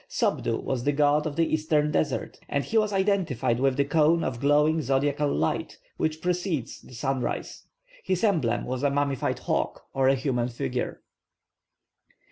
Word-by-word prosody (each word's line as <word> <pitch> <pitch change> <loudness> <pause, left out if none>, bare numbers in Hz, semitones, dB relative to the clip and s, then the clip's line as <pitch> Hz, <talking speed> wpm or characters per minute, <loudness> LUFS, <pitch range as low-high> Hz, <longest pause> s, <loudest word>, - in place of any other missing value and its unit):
+Sopdu+ - - 0
was 130 -3 -2
the 145 - +2
god 150 +1 +3
of 145 - -5
the 165 - +3
eastern 155 -1 +1
desert, 130 -9 -1
and 140 0 0
he 230 - -6
was 215 -1 +3
identified 190 - +1
with 135 0 +2
the 140 - +3
cone 160 +3 +3
of 120 - -3
glowing 150 +3 +3
zodiacal 140 +2 +1
light 80 - -1 0.2
which 155 0 -2
precedes 175 - -2
the 125 - -14
sunrise. 130 0 -3 0.4
His 185 +1 -1
emblem 155 - +1
was 130 0 -3
a 145 - +3
mummified 140 -1 0
hawk, - - -2
or 135 -1 +2
a 135 - +5
human 125 -3 -1
figure. 120 -1 -4
145 Hz, 160 wpm, -26 LUFS, 130-160 Hz, 0.4 s, a